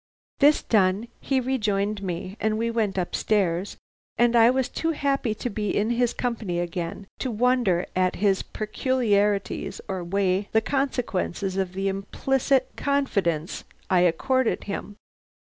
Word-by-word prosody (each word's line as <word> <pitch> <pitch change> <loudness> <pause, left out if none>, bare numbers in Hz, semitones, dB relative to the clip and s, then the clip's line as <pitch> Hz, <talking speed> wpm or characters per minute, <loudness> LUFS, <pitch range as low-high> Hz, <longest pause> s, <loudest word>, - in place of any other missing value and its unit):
"This 295 +1 +5
done, 200 +1 +2
he 270 -1 0
rejoined 210 -5 0
me, 185 0 -4
and 215 +1 0
we 230 +1 0
went 215 -4 -1
up 180 -2 -2
stairs, 190 -3 0 0.4
and 240 0 +3
I 230 0 +7
was 260 0 +1
too 325 0 -1
happy 275 -6 0
to 230 - -4
be 210 -3 -2
in 215 +3 +1
his 240 0 +2
company 225 -8 -2
again 175 +2 -4
to 260 - -2
wonder 235 -6 +2
at 185 0 +2
his 195 -1 +2
peculiarities 210 -3 0
or 190 -2 -3
weigh 195 +2 0
the 220 - +6
consequences 220 -8 -1
of 190 -2 -1
the 195 +1 -2
implicit 260 +7 0
confidence 200 - 0 0.3
I 185 - +5
accorded 240 +9 +2
him. 205 0 -5
210 Hz, 140 wpm, -25 LUFS, 190-245 Hz, 0.4 s, I